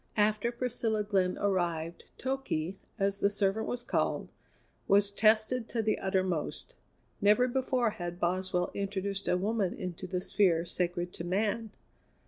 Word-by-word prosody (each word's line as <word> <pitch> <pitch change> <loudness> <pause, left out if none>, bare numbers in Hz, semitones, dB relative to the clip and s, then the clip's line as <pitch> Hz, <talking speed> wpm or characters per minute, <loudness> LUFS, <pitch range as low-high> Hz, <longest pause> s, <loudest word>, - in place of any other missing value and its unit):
After 215 +2 +2
Priscilla 235 -3 -1
Glenn 190 -3 +1
arrived, 170 -4 -1
Toky, 260 -11 -2 0.2
as 200 0 0
the 200 - +3
servant 205 +1 0
was 245 0 -3
called, - - 0 0.6
was 200 0 +5
tested 220 +3 +3
to 230 -2 -1
the 215 - +1
uttermost. 185 -5 -1 0.5
Never 210 +5 +5
before 255 -2 +1
had 175 -2 -5
Boswell 180 0 0
introduced 195 0 -3
a 180 - +3
woman 200 -1 0
into 180 0 -5
the 180 0 -1
sphere 180 -3 +2
sacred 175 0 -2
to - - -6
Man. 210 +5 0
200 Hz, 135 wpm, -31 LUFS, 180-220 Hz, 0.6 s, was